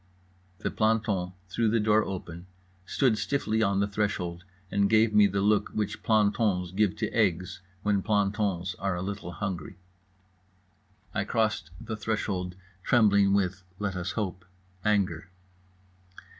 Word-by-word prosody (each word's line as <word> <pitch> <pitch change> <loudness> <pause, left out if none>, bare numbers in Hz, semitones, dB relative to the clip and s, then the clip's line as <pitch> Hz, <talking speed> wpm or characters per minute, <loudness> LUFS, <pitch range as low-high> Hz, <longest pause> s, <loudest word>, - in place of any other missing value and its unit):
_" - - -22
The - - 0
planton 105 -5 +1
threw 110 +5 +1
the 115 +1 +2
door 105 0 +3
open, 85 -2 -6 0.4
stood 125 -6 +2
stiffly 110 -6 0
on 100 -2 +2
the 100 - +2
threshold, 100 -4 -2 0.3
and 100 0 +2
gave 110 0 +4
me 105 -1 +7
the 100 0 -1
look 105 +1 +2
which 105 -1 -2
plantons 105 -4 +2
give 105 +1 +1
to 110 0 -3
eggs 90 -5 0 0.2
when 105 -2 +2
plantons 100 -3 0
are 95 -2 -1
a 90 - -3
little 100 -3 -5
hungry. 95 -6 -4 1.4
I 95 - 0
crossed 110 -7 0
the 110 - -5
threshold, 100 -5 -2 0.3
trembling 100 -3 +4
with 95 -1 0 0.2
(let 100 -2 -2
us 90 +1 -3
hope) 95 -4 -3 0.4
anger. 95 -5 +1
100 Hz, 140 wpm, -28 LUFS, 95-110 Hz, 1.4 s, me